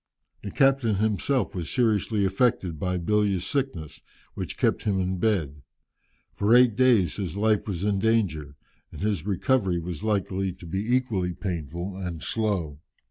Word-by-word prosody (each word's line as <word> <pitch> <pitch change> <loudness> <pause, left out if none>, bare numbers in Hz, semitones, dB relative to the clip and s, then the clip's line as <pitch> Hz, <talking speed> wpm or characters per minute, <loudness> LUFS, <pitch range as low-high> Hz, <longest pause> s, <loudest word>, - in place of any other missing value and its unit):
The 100 - -6
captain 135 -2 +2
himself 110 +6 0
was 85 -4 -4
seriously 110 -3 +1
affected 95 - 0
by 90 +2 -1
bilious 100 0 +1
sickness, 130 - -3 0.3
which - - -5
kept - - +1
him 100 -3 +1
in 95 0 -1
bed. 80 -10 0 0.7
For 105 +4 +3
eight 125 -3 +5
days 115 - +3
his 95 -2 -4
life 110 0 +1
was 95 -3 -3
in 100 -1 +1
danger, 95 -10 0 0.4
and - - -9
his 100 -4 -1
recovery 100 -2 +1
was 85 -1 -5
likely 95 -3 -1
to 90 -1 -13
be 100 +9 0
equally 95 -9 -1
painful 85 +1 -5
and 90 -4 -5
slow. 95 -10 -2
100 Hz, 150 wpm, -26 LUFS, 90-110 Hz, 0.7 s, eight